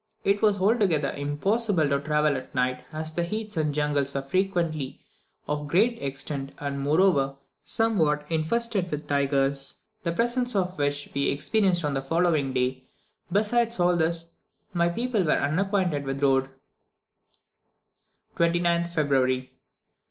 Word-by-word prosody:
It 200 +1 +2
was 210 -2 +3
altogether 190 - +2
impossible 170 +5 0
to 140 0 +1
travel 150 0 +1
at 130 0 -7
night, 125 0 0
as 155 0 -4
the 175 - 0
heaths 215 +4 -4
and 155 -2 0
jungles 145 -1 0
were 135 - -1
frequently 165 -3 -1 0.5
of 150 0 -2
great 220 +10 +2
extent, 140 0 -4
and 140 -1 -4
moreover, 145 -2 +2 0.3
somewhat 160 -8 +1
infested 190 +4 +1
with 150 -1 -4
tigers, 140 -1 0 0.3
the 170 -5 -1
presence 240 +5 0
of 185 -3 -1
which 145 0 -1
we 140 0 +1
experienced 180 +3 +1
on 145 - 0
the 135 - -1
following 155 -1 +1
day; 130 0 -1 0.5
besides 225 +3 +2
all 175 0 +3
this, 165 0 -1 0.4
my 170 -1 +2
people 230 +2 0
were 155 - +2
unacquainted 175 -1 0
with 135 0 -3
the 140 - +2
road. 135 -1 +2 1.9
29th 170 0 +2
February. 130 -4 +1
155 Hz, 135 wpm, -26 LUFS, 140-190 Hz, 1.9 s, was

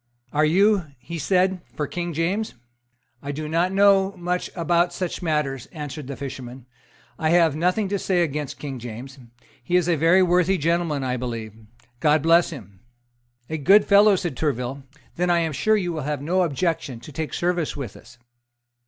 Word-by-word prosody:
"Are 150 +1 +3
you," 195 +2 +3
he 165 +7 -7
said, 185 +3 +1
"for 150 - -1
King 175 +3 -4
James?" 180 +7 -1 0.7
"I 140 - -4
do 155 +2 -5
not 170 +4 +1
know 195 0 +4
much 180 +1 -2
about 175 0 +2
such 180 +1 -4
matters," 150 -6 -1
answered 150 -3 -7
the 140 - -5
fisherman. 130 -2 -8 0.5
"I 160 -1 +1
have 165 -3 +4
nothing 180 +6 +1
to 200 0 -1
say 180 -2 +1
against 150 -3 -4
King 135 -3 -6
James. 120 +4 -8 0.4
He 175 - -1
is 180 -2 +3
a 175 - +3
very 165 +5 +4
worthy 180 +1 +3
gentleman, 165 -3 0
I 130 -1 -1
believe. 115 -3 -5 0.5
God 150 0 +3
bless 170 +1 +4
him!" 100 - -11 0.7
"A 160 0 -4
good 200 +8 +5
fellow!" 205 0 +6
said 175 -6 -3
Tourville: 135 -2 -2 0.4
"then 180 +1 +1
I 170 -1 +3
am 160 -2 -1
sure 215 +9 +2
you 175 -4 -2
will 155 - -3
have 145 0 -2
no 180 +5 +1
objection 160 -6 -1
to 150 - -11
take 155 +2 -4
service 175 -4 -1
with 125 -8 -6
us." 120 0 -16
165 Hz, 180 wpm, -23 LUFS, 140-180 Hz, 0.7 s, fellow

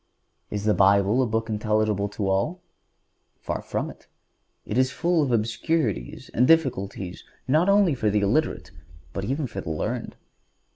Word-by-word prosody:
Is 105 -1 -3
the 105 0 +3
Bible 100 +5 +4
a 130 - +1
book 110 0 -1
intelligible 105 -2 0
to 100 -1 -3
all? 150 - 0 0.8
Far - - -4
from - - -3
it; - - -19 0.6
it 105 - -4
is 130 +1 +3
full 170 +2 +1
of 140 -4 0
obscurities 115 - -1
and 125 +2 +3
difficulties 100 - +1 0.2
not 155 +8 +3
only 200 -5 +4
for 110 -5 0
the 105 0 +1
illiterate, 115 +11 0 0.4
but 100 - -3
even 140 +5 -1
for 100 -6 -5
the - - -6
learned. 80 - -3
110 Hz, 155 wpm, -25 LUFS, 100-145 Hz, 0.8 s, Bible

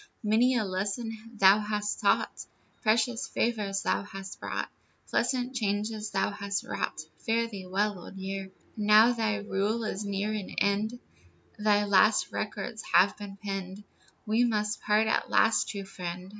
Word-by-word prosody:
Many 230 +5 +3
a 225 - +1
lesson 200 +4 -2 0.2
thou 195 0 +6
hast 210 0 -2
taught, - - +1 0.3
Precious 230 +1 +1
favors 210 -4 -1
thou - - +1
hast 195 -1 -8
brought, - - -3 0.4
Pleasant 255 0 0
changes 210 -1 -1
thou 195 0 0
hast 200 -1 -3
wrought, - - -3 0.2
Fare 230 +1 0
thee 195 -5 -8
well, 200 +1 0
Old 175 - -11
Year. 195 0 -5 0.3
Now 215 +3 +6
thy 220 -3 0
rule 210 +2 -1
is 210 -1 -3
near 200 +1 -2
an 210 -3 -5
end, 210 +4 +1 0.6
Thy 210 -1 +3
last 205 +2 +4
records 220 +1 -4
have 190 +3 +6
been 200 -1 -9
penned, 195 0 -5 0.4
We 220 +2 +2
must 210 -3 0
part 210 +1 +3
at 220 - 0
last, 225 0 +3
true 200 -1 -5
friend. 180 -1 -6
210 Hz, 150 wpm, -29 LUFS, 195-220 Hz, 0.6 s, thou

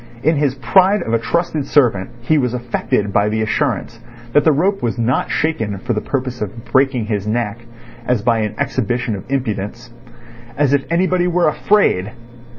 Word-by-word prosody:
In 160 +2 +3
his 140 -2 +1
pride 190 - +3
of 115 - -3
a 115 - +3
trusted 155 +3 -1
servant 110 -10 +2
he 150 +6 +2
was 125 -2 0
affected 115 -4 -1
by 105 +1 +3
the 110 +1 0
assurance 115 -1 -1 0.3
that 145 - +5
the 160 - +5
rope 190 +7 +1
was 120 0 -1
not 120 +3 0
shaken 145 -11 -1
for 120 - -3
the 105 - -1
purpose 130 -2 -3
of 105 +2 -6
breaking 130 -3 +1
his 105 -2 -2
neck, 115 0 -1 0.5
as 125 -4 +1
by 115 -1 +2
an 105 -1 -2
exhibition 120 -2 -1
of 95 - -10
impudence. 115 -4 -3 0.7
As 145 -1 +2
if 140 -1 +1
anybody 180 +1 +2
were 175 -1 +2
afraid! 145 - +2
125 Hz, 175 wpm, -18 LUFS, 110-145 Hz, 0.7 s, that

